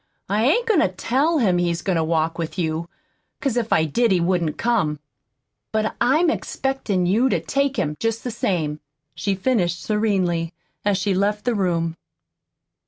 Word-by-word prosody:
I 210 +4 +1
ain't 470 - +3
goin' 440 -7 +3
to - - +4
TELL 265 - 0
him 190 -10 +2
he's 170 -1 -1
goin' 190 -3 0
to 165 - +2
walk 160 +1 0
with 165 +2 -4
you, 165 -1 -2 0.5
'cause 270 -5 -1
if 230 -2 -1
I 160 - +4
did 230 +9 +1
he 185 - +3
wouldn't 170 -3 0
come. 200 -11 0 0.7
But 220 0 0
I'm 310 +8 +4
expectin' 265 - -1
you 225 +9 +3
to - - +1
take 275 0 -1
him, 150 0 -1
jest 225 0 -1
the 245 - -3
same," 160 -9 -1 0.3
she 200 -1 -1
finished 185 -5 0
severely, 190 -6 0 0.3
as 205 -2 +2
she 195 +1 0
left 205 +3 0
the 245 - +2
room. 170 -5 0
195 Hz, 170 wpm, -22 LUFS, 170-240 Hz, 0.7 s, to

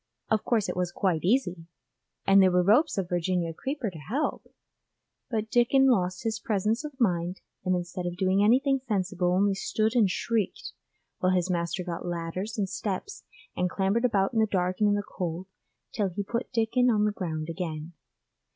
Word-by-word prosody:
Of 220 - +2
course 225 -5 +1
it - - -3
was 180 -1 -1
quite 175 -4 0
easy, 180 -6 +1 0.6
and 195 0 +6
there 190 - +6
were 180 0 +3
ropes 215 - +3
of 190 -3 -1
Virginia 175 -1 -1
creeper 265 - -3
to 165 - -10
help, 255 - -2 0.8
but 220 -2 -2
Dickon 265 +2 +4
lost 185 -4 0
his 225 -1 -1
presence 215 +4 0
of 295 -3 -8
mind, 180 -5 0 0.2
and 185 0 +1
instead 175 +1 -4
of 175 0 -5
doing 190 +2 +2
anything 270 +5 +4
sensible 185 -4 0
only 195 +2 +3
stood 215 +3 0
and 220 -5 +4
shrieked, 220 +1 -2 0.5
while 185 0 +2
his 180 0 +1
master 170 +1 -1
got 175 -2 -5
ladders 175 +5 -4
and 200 -2 0
steps 205 - -4 0.3
and 180 0 0
clambered 195 +5 0
about 205 -4 +2
in 225 - +1
the 220 - +3
dark 185 -2 0
and 210 -1 +4
in 205 - +3
the 205 - -1
cold, 180 -3 -4 0.5
till 205 -3 0
he 200 +3 -4
put 235 +5 -3
Dickon 245 +1 +2
on 210 -3 +3
the 210 - +2
ground 160 -6 -4
again. 165 -1 -5
195 Hz, 185 wpm, -27 LUFS, 180-225 Hz, 0.8 s, and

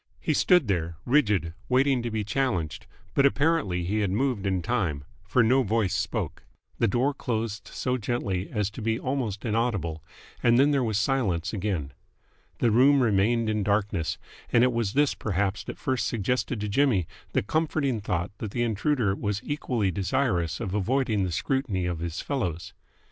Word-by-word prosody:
He - - 0
stood 180 - +4
there, 85 -4 -1
rigid, 105 - +2 0.2
waiting 130 0 +3
to 120 - -3
be 110 -1 -2
challenged, 105 - -1 0.3
but 140 - +3
apparently 140 - +2
he 100 +5 -1
had 100 -3 +1
moved 110 -1 0
in 95 -3 0
time, 95 - -1 0.2
for 125 - +3
no 130 +4 +4
voice 110 -4 +1
spoke. - - -2 0.4
The 115 - +3
door 125 +7 +1
closed 110 -4 -3
so 125 0 -1
gently 100 -5 -2
as 105 -2 -1
to 115 - -8
be 110 +1 0
almost 125 -6 -2
inaudible, 105 -9 -1 0.4
and 120 0 +4
then 140 +3 +5
there 140 -3 +2
was 110 -4 0
silence 105 -8 0
again. 95 -9 -2 0.7
The 115 - +2
room 135 +4 +5
remained 115 +2 +2
in 110 -1 0
darkness, 100 -4 0 0.3
and 120 - +5
it 125 -1 +3
was 115 -4 -1
this 145 0 +3
perhaps 100 -1 -1
that - - -6
first 130 -2 -1
suggested 115 +1 -1
to 105 - -2
Jimmy 110 - +2 0.3
the - - +2
comforting 145 -2 0
thought 90 -2 -2
that 110 - -4
the 120 +4 -1
intruder 115 -1 +1
was 100 +1 -2
equally 125 -9 -1
desirous 90 -2 0
of 100 -6 -4
avoiding 110 0 +1
the 90 - -3
scrutiny 105 - -1
of 90 -2 -2
his 85 0 -4
fellows. 90 - -3
110 Hz, 170 wpm, -27 LUFS, 95-130 Hz, 0.7 s, then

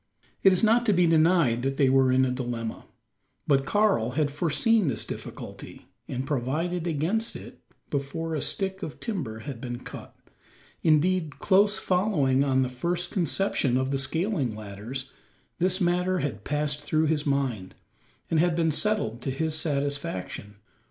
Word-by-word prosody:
It 195 - +6
is 185 - +2
not 230 +2 +4
to 210 - +5
be 180 -1 +4
denied 160 -7 +3
that 135 +1 -2
they 140 - +4
were 130 0 +4
in 130 0 +4
a 125 - 0
dilemma. 120 -3 -4 0.6
But 135 -1 +2
Karl 200 - +2
had 150 -2 +1
foreseen 175 +7 +2
this 110 -5 0
difficulty, - - -8 0.2
and 130 +1 -3
provided 155 +6 -1
against 175 +9 0
it - - -10 0.3
before 155 +4 -3
a 155 - -1
stick 190 -1 -2
of 150 - -6
timber 140 - -4
had 130 -2 -7
been 120 -1 -5
cut. - - -10 0.7
Indeed, 160 0 +2
close 205 +2 +3
following 160 -9 +2
on 130 -1 +2
the - - 0
first 170 +8 -2
conception 170 -8 +1
of 130 +1 -1
the 135 - 0
scaling 145 - -1
ladders, 110 +6 -6 0.5
this 185 +2 +1
matter 180 +1 +1
had 135 - -3
passed 150 0 -1
through 155 +2 +1
his 150 -1 0
mind, 130 -9 -1 0.6
and 160 - +3
had 175 0 +2
been 165 -1 +2
settled 150 - 0
to 135 - -3
his 155 +4 -1
satisfaction. 140 - -2
150 Hz, 160 wpm, -26 LUFS, 130-175 Hz, 0.7 s, It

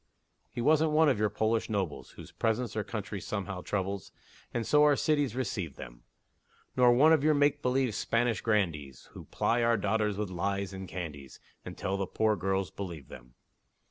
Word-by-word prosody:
He 120 - -5
wasn't 155 +3 +3
one 155 0 +5
of 125 -7 +1
your 105 0 +2
Polish 110 +3 0
nobles, 95 -9 -3
Whose - - -11
presence 115 0 -1
their 110 - -2
country 105 -2 -5
somehow 95 -3 -4
troubles, 100 0 -3 0.4
And 115 -1 -2
so 150 +5 +4
our 150 -1 +5
cities 145 -5 +1
receive 100 - -3
them; - - -10 0.7
Nor 125 -1 +5
one 150 +6 +6
of 155 -3 +3
your 155 0 +4
make 145 0 +2
believe 125 -2 +1
Spanish 115 0 0
grandees, 80 - -1
Who - - -11
ply 120 +1 0
our 115 0 +3
daughters 105 0 0
with 105 -3 -3
lies 100 +2 -2
and 95 0 -7
candies, 75 -8 -7 0.2
Until 95 +1 -4
the 95 -1 -2
poor 110 +2 +1
girls 95 -2 -1
believe 85 -9 -7
them. - - -13
105 Hz, 175 wpm, -30 LUFS, 95-125 Hz, 0.7 s, one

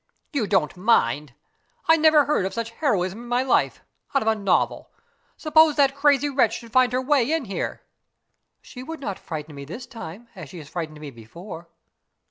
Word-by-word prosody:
"You 250 -8 0
don't 190 -7 +1
mind? 150 - +1 0.5
I 325 - +7
never 310 -2 +5
heard 290 -9 +1
of - - -8
such 230 0 -3
heroism 210 - -1
in 240 - -10
my 245 +1 +1
life 265 - +1 0.3
out 275 - +3
of - - -6
a 220 - +5
novel! 200 -2 0 0.5
Suppose 315 -1 +4
that 275 -2 +3
crazy 285 0 +3
wretch 275 -3 +2
should 230 -2 -12
find 255 0 +4
her 250 - +1
way 275 -1 +2
in 325 -4 0
here?" 195 - -4 0.8
"She 250 - -10
would 320 +4 -7
not 200 -8 -5
frighten 155 -2 -7
me 140 -1 -8
this 200 - -8
time 230 -3 -10
as 175 -7 -9
she 170 -4 -9
frightened 155 0 -6
me 150 -2 -8
before." 165 - -11
230 Hz, 185 wpm, -24 LUFS, 170-275 Hz, 0.8 s, I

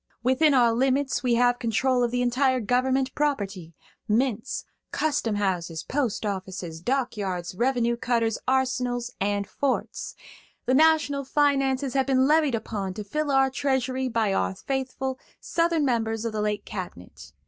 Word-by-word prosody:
Within 270 +4 +4
our 240 -3 +4
limits 265 +3 +1
we 245 -2 +2
have 245 0 +3
control 250 +2 +1
of 240 - +2
the 245 +1 0
entire 255 +1 +2
government 255 +3 +1
property–mints, 215 - -2 0.3
custom 285 -8 0
houses, 175 -5 -2
post 255 -6 -1
offices, 185 -4 -5
dock 255 +4 -1
yards, 185 -4 -3
revenue 235 +2 +1
cutters, 230 -2 0
arsenals 250 -2 0
and 200 0 0
forts. 275 +5 -3 0.5
The 255 - +2
national 305 -1 +3
finances 275 -1 +1
have 270 -1 +1
been 260 -1 +3
levied 300 -3 +3
upon 205 -4 -4
to 210 - -5
fill 300 +8 -2
our 270 -1 +3
treasury 260 -1 0
by 225 -4 0
our 95 - 0
faithful 265 -1 -3 0.2
Southern 335 -3 +1
members 225 -3 0
of 230 - -2
the 215 - -1
late 210 -1 -2
cabinet. 180 - -8
245 Hz, 145 wpm, -26 LUFS, 210-270 Hz, 0.5 s, Within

